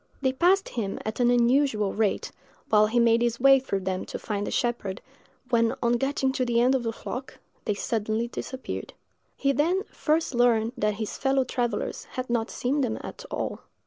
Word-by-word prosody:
They 260 -1 +2
passed 365 +8 +3
him 210 -5 -3
at 215 +2 -4
an 245 -1 +4
unusual 245 -3 +3
rate, 215 -2 0 0.4
while 215 -1 +5
he 240 +3 +1
made 235 0 +4
his 235 -1 0
way 270 +1 +7
through 200 -7 -2
them 185 0 -2
to - - -5
find 205 -2 -3
the - - -3
shepherd, 235 -6 -1 0.5
when, 230 -1 +3
on 235 - +3
getting 270 +1 0
to 265 - -1
the 240 -1 +1
end 250 +2 +4
of 265 - +1
the 230 -1 -2
flock, 255 +4 -7 0.3
they 210 - 0
suddenly 220 +2 -1
disappeared. 260 +2 -6 0.4
He 275 - +2
then 335 +8 +1
first 315 -1 0
learned 235 -2 +3
that 210 -4 0
his 215 0 -5
fellow 270 0 +2
travellers 240 -3 -2
had 255 -1 -4
not 230 -1 0
seen 275 +4 -1
them 230 -4 -1
at - - -8
all. - - -3
240 Hz, 190 wpm, -26 LUFS, 220-265 Hz, 0.5 s, way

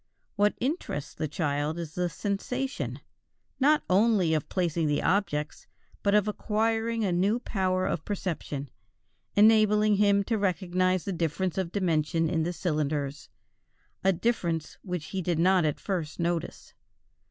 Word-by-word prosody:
What 205 0 +2
interests 250 - -3
the 155 - -3
child 150 0 -1
is 165 -2 -6
the 180 0 -1
sensation, 250 - -3 0.6
not 300 +3 +4
only 195 -3 +3
of 155 - -1
placing 170 -3 0
the 145 0 0
objects 160 -5 -1 0.3
but 200 0 +2
of 210 0 +3
acquiring 225 +2 0
a 190 - +1
new 195 +6 +2
power 185 -5 0
of 155 - -2
perception, 160 - -4 0.6
enabling 215 -1 +5
him 200 -1 +4
to 220 +1 -1
recognize 185 -1 +1
the 195 - -2
difference 170 +2 -1
of 175 -3 -2
dimension 165 -3 +1
in 165 - +1
the 170 +2 -1
cylinders, 150 -4 -2 0.7
a 195 - +5
difference 170 -5 -1
which 180 -5 -4
he 190 - -2
did 175 -2 -1
not 180 0 +4
at 150 - -1
first 170 -6 -3
notice. 170 -1 -3
185 Hz, 140 wpm, -28 LUFS, 160-205 Hz, 0.7 s, enabling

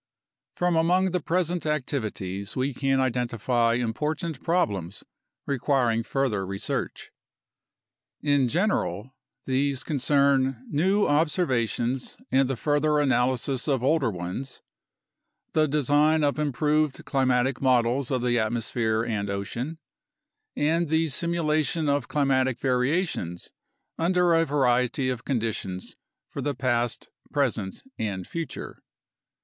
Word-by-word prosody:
From 175 -1 +1
among 180 +3 +3
the 180 - 0
present 175 +1 -1
activities 110 -9 -3
we 130 +2 0
can 135 +1 +1
identify 120 -2 +1
important 150 +6 -2
prob 175 -8 +2
lems 95 -1 -6 0.4
requiring 125 -4 +1
further 115 -5 -1
research. 95 +1 -4 1.1
In 145 -3 +2
general, 130 - -1 0.3
these 135 0 0
concern 135 -3 +2
new 190 +8 +2
observa 145 - +1
tions 125 +2 -2
and 135 0 +3
the 135 - 0
further 150 +3 +2
analysis 130 -1 +1
of 135 -4 +1
older 140 -2 +2
ones, 95 +8 -6 0.9
the 155 -1 +3
design 150 +2 +3
of 145 +1 +1
improved 150 0 0
climatic 130 -1 +1
models 125 0 +2
of 130 -3 -1
the 120 -1 +2
atmosphere 110 0 0
and 100 -3 -2
ocean, 115 +10 -4 0.8
and 165 +3 +1
the 160 +1 +1
simulation 155 0 0
of 140 0 +1
climatic 130 -3 +1
variations 125 - -1 0.5
under 175 +1 +3
a 165 0 +4
variety 130 -2 +1
of 125 -3 -3
conditions 110 -7 -3 0.3
for - - -6
the 145 -1 -2
past, 120 -1 -1 0.2
present, 115 -9 -1 0.2
and 95 -4 -3
future. 165 -5 -6
135 Hz, 115 wpm, -26 LUFS, 120-150 Hz, 1.1 s, a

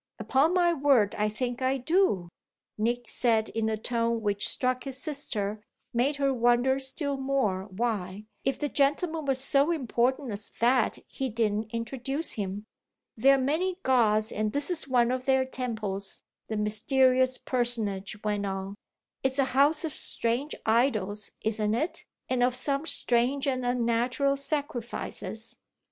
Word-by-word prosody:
"Upon 300 +7 +2
my 350 -1 +4
word 270 -9 +3
I 210 0 +1
think 245 +3 -3
I 260 +1 +2
do!" 285 - +2 0.5
Nick 240 +2 -1
said 225 -3 +1
in 220 0 -1
a 220 - -1
tone 230 0 -1
which 205 -1 0
struck 255 -1 -1
his 270 -2 -2
sister 275 -8 -1
and 215 - -9 0.3
made 255 +5 +2
her 275 -1 +1
wonder 245 +2 +3
still 275 +1 -2
more 265 -9 0
why, 205 -1 -3 0.2
if 270 - 0
the 295 - -1
gentleman 300 +3 +1
was 270 -2 +1
so 275 +3 +3
important 260 -3 0
as 205 0 -5
that, 240 0 +3
he 265 -1 -3
didn't 215 -1 0
introduce 260 +6 -2
him. 200 -1 -3 0.5
"There 270 +5 +5
are - - +1
many 320 +8 0
gods 220 -4 +3
and 215 0 -1
this 285 +4 -1
is 320 -5 -2
one 245 -2 +3
of 255 0 -2
their 265 -1 +3
temples," 220 -7 -4 0.2
the 220 - -3
mysterious 255 +5 +2
personage 220 -6 -2
went 205 -1 -1
on. 195 0 -4 0.5
"It's 265 0 0
a 275 - +4
house 295 +4 +3
of 310 - -4
strange 240 +6 -1
idols 215 -3 +1
isn't 215 -1 0
it? 310 +9 -2 0.2
and 255 -1 0
of 250 0 +3
some 275 +4 -1
strange 250 +2 +1
and 255 -2 0
unnatural 245 +3 +1
sacrifices." 270 -5 -4
245 Hz, 155 wpm, -28 LUFS, 220-275 Hz, 0.5 s, There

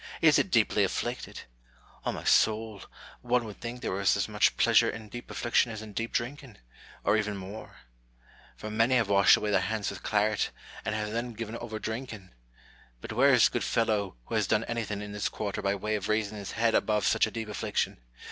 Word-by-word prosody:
is - - +5
it - - 0
deeply - - +3
afflicted! - - -3 0.7
O' - - +2
my - - -6
soul, 110 -2 +2 0.4
one 125 -1 +1
would 105 -2 -10
think 120 +1 -6
there - - -2
was 95 0 +2
as - - 0
much - - +2
pleasure - - +5
in 110 -1 -7
deep 120 +3 -9
affliction 120 0 +1
as 110 0 -6
in 105 -1 -10
deep 115 +3 -3
drinking, 125 -2 -4 0.5
or - - +3
even 105 -1 -2
more: 100 +3 -9 0.8
for 110 - -6
many 115 +4 +3
have 115 -5 +2
washed 100 -1 +6
away 105 - -2
their 95 - +4
lands 105 +1 -2
with 100 - -9
claret, 105 0 +1 0.4
and 105 - -1
have 105 -1 -2
then 120 +2 -3
given 115 0 -6
over 115 -2 -6
drinking; 110 -4 -6 0.7
but 110 - -7
where 135 +5 +5
is 125 -3 +6
the - - -10
good 120 - 0
fellow 105 - 0
who - - -8
has 105 -3 +1
done 110 0 +2
anything 110 -4 -3
in 105 - -7
this 105 0 -2
quarter 105 -1 -4
by 100 0 0
way 105 +2 -3
of 105 -2 -2
raising 110 -1 0
his 100 - -6
head 115 0 +2
above 105 -2 +2
such - - +3
a - - -7
deep 110 0 -5
affliction 105 - -2
110 Hz, 210 wpm, -29 LUFS, 105-115 Hz, 0.8 s, washed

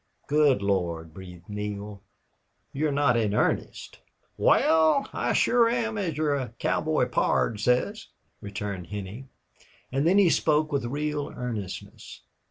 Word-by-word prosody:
"Good 145 -7 +3
Lord!" 85 -5 -1
breathed 90 -1 -12
Neale. 105 -1 -6 0.7
"You're 150 +2 0
not 140 -3 +2
in 105 -3 0
earnest?" - - -1 0.4
"Wal, 160 - +3
I - - -1
shore 235 -1 +4
am, 230 -2 -1
as 170 -7 -2
your 140 -6 -1
cowboy - - 0
pard 110 - +1
says," 125 - 0 0.3
returned 100 -3 -5
Henney. 105 +5 -7 0.6
And 135 +4 +1
then 185 +3 +4
he 190 -5 +5
spoke 155 0 +2
with 140 -4 -1
real 145 +3 -2
earnestness. 115 -6 -7
125 Hz, 125 wpm, -26 LUFS, 100-155 Hz, 0.7 s, he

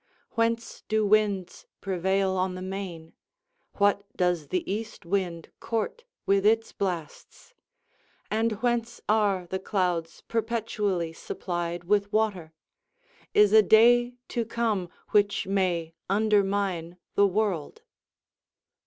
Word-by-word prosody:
whence 230 0 -1
do 215 0 +1
winds 205 -3 +1
prevail 190 0 0
on 185 0 -1
the 185 - -6
main? 185 -4 -6 0.6
what 200 0 +2
does 175 -4 +1
the 180 +4 -1
east 215 -1 -4
wind 175 -2 -2
court 345 - -3 0.2
with 195 0 +3
its 225 +2 +3
blasts? 180 - -5 0.8
and 225 +1 +1
whence 235 -1 0
are 205 -4 +2
the 190 - -1
clouds 180 -4 -1
perpetually 215 -7 -1
supplied 175 0 -4
with 205 +2 +1
water? 205 -7 0 0.8
is 210 0 +6
a 220 - +9
day 240 +4 +5
to 235 - -1
come 220 -5 -1 0.2
which 205 -1 +2
may 180 -4 0 0.2
undermine 195 -4 +1 0.2
the 200 - +5
world?" 200 - -2
200 Hz, 110 wpm, -27 LUFS, 180-220 Hz, 0.8 s, a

